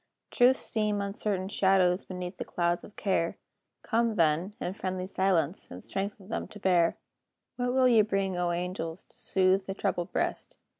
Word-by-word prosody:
Truths 255 Hz, +1 st, +4 dB
seem 210 Hz, -2 st, 0 dB
uncertain 200 Hz, -1 st, -2 dB
shadows 190 Hz, -2 st, +3 dB
Beneath 180 Hz, 0 st, -6 dB
the -, -, -3 dB
clouds 175 Hz, 0 st, -1 dB
of 210 Hz, -, -13 dB
care; 180 Hz, -4 st, 0 dB, 0.5 s
Come, 230 Hz, -1 st, +1 dB
then, 170 Hz, +3 st, +2 dB
in 180 Hz, -, -3 dB
friendly 185 Hz, -1 st, -3 dB
silence, 185 Hz, -3 st, 0 dB
And 90 Hz, -, -9 dB
strengthen 195 Hz, 0 st, -4 dB
them 220 Hz, -, -3 dB
to 210 Hz, -, -12 dB
bear. 175 Hz, -4 st, +3 dB, 0.6 s
What 245 Hz, 0 st, -1 dB
will 260 Hz, 0 st, +4 dB
ye 230 Hz, -3 st, +6 dB
bring, 195 Hz, -3 st, 0 dB
O 175 Hz, 0 st, 0 dB
angels, 175 Hz, -1 st, -3 dB
To -, -, -25 dB
soothe 190 Hz, 0 st, +2 dB
the 195 Hz, -, -3 dB
troubled 190 Hz, -4 st, -2 dB
breast? -, -, -2 dB
190 Hz, 165 wpm, -29 LUFS, 180-205 Hz, 0.6 s, ye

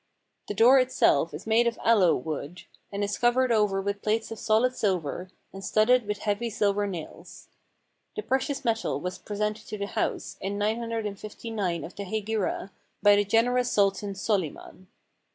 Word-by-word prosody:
The 205 Hz, -, -4 dB
door 245 Hz, +6 st, +7 dB
itself 250 Hz, -, +2 dB
is 150 Hz, -, -8 dB
made 225 Hz, +2 st, +3 dB
of 235 Hz, -, -1 dB
aloe 210 Hz, -7 st, +5 dB
wood, 155 Hz, +4 st, -5 dB, 0.3 s
and 200 Hz, 0 st, -2 dB
is 200 Hz, 0 st, -2 dB
covered 245 Hz, +1 st, +3 dB
over 210 Hz, -3 st, +2 dB
with 200 Hz, +1 st, -3 dB
plates 220 Hz, +1 st, -1 dB
of 225 Hz, -, -6 dB
solid 230 Hz, +3 st, +2 dB
silver, 185 Hz, -, -1 dB, 0.2 s
and 195 Hz, 0 st, -8 dB
studded 220 Hz, +2 st, +3 dB
with 210 Hz, 0 st, -2 dB
heavy 215 Hz, +3 st, -1 dB
silver 205 Hz, -1 st, +1 dB
nails. 175 Hz, -5 st, -9 dB, 0.7 s
The 425 Hz, -, -4 dB
precious 270 Hz, +1 st, -1 dB
metal 225 Hz, -, 0 dB
was 180 Hz, +3 st, -5 dB
pre 205 Hz, -, -7 dB
sented 210 Hz, +1 st, -2 dB
to 215 Hz, -, -5 dB
the 200 Hz, -, -3 dB
house, 200 Hz, -, -3 dB
in 200 Hz, +1 st, -3 dB
959 215 Hz, -4 st, -3 dB
of 175 Hz, -, -9 dB
the 200 Hz, -, -5 dB
Hegira, 210 Hz, -1 st, -2 dB, 0.3 s
by 205 Hz, 0 st, +7 dB
the 205 Hz, -, +3 dB
gen 225 Hz, +3 st, +3 dB
erous 250 Hz, 0 st, +1 dB
Sultan 200 Hz, -1 st, +1 dB
Solyman. 185 Hz, -2 st, -3 dB
210 Hz, 170 wpm, -27 LUFS, 195-230 Hz, 0.7 s, door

